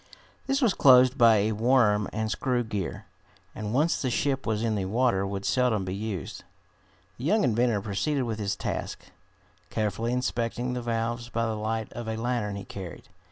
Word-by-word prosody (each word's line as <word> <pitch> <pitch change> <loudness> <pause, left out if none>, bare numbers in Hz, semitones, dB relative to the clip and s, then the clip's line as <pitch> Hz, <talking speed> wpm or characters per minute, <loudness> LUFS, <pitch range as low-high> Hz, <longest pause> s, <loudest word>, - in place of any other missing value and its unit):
This 270 0 +1
was 225 -6 +4
closed 130 -1 +6
by 115 -4 +6
a 105 +2 +1
worm 110 -2 +3
and 110 0 -2
screw 125 +1 0
gear, 105 -5 -4 0.5
and 105 -1 -5
once 150 +7 +1
the 130 - 0
ship 135 +2 -1
was 110 0 0
in 115 -1 +1
the 100 -3 -1
water 100 -2 +1
would 100 0 -4
seldom 120 -6 +1
be 90 - -3
used. 100 -3 -5 0.8
The 125 - -5
young 210 +7 +3
inventor 120 -3 +2
proceeded 110 +8 -1
with 115 -3 -3
his 100 -1 -1
task, - - -5 0.6
carefully 110 +2 -1
inspecting 125 0 -1
the 125 - -3
valves 120 0 -2
by 115 -1 -1
the 110 - -1
light 110 +1 -3
of 120 -1 -6
a 110 0 -2
lantern 115 -3 -1
he 100 - -7
carried. 95 -4 -9
115 Hz, 180 wpm, -27 LUFS, 105-125 Hz, 0.8 s, closed